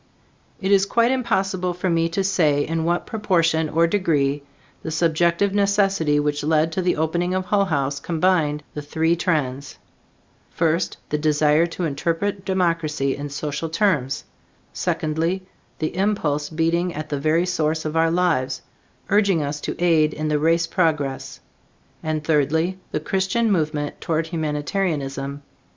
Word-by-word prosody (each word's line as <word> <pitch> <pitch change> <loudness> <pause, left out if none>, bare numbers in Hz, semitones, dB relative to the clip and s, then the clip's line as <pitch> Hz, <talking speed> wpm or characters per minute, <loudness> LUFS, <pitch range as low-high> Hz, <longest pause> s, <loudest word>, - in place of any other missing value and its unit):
It 195 0 -1
is 200 0 +4
quite 235 +4 +3
impossible 190 -8 0
for 180 +1 -2
me 165 -1 +2
to 190 +4 -1
say 155 -7 +2
in 165 0 -2
what 175 +1 0
proportion 165 -7 +1
or 165 +2 +3
degree 150 -7 +1 0.4
the - - -5
subjective 170 +4 +1
necessity 195 -7 +2
which 145 0 -1
led 155 +1 +2
to 185 - -1
the 180 0 +1
opening 175 +3 0
of 185 0 -1
Hull 200 0 +2
House 140 -5 -1
combined 160 -3 +1
the 150 - -5
three 160 +3 +1
trends: 140 -6 -2 0.7
first, 165 +1 0
the 150 - -1
desire 150 +1 +3
to 175 +1 -5
interpret 170 +6 -1
democracy 165 -7 0
in 145 0 -6
social 150 +2 -4
terms; 160 -8 0 0.5
secondly, 165 +4 -1 0.3
the 155 +1 -3
impulse 165 -7 0
beating 165 +2 0
at 155 +1 -5
the 145 - -2
very 155 +4 +2
source 160 -3 -1
of 155 +1 -3
our 165 0 +3
lives, 165 -7 0 0.5
urging 200 -6 +3
us 145 +1 -4
to - - -5
aid 160 -3 +3
in 155 0 -2
the 150 -1 +1
race 165 +2 +2
progress; 155 -6 -1 0.6
and, 155 -1 -2
thirdly, 160 +4 +1
the - - -1
Christian 190 +7 0
movement 150 -4 -1
toward 160 0 0
humanitarianism. 150 -3 -2
165 Hz, 145 wpm, -22 LUFS, 150-180 Hz, 0.7 s, is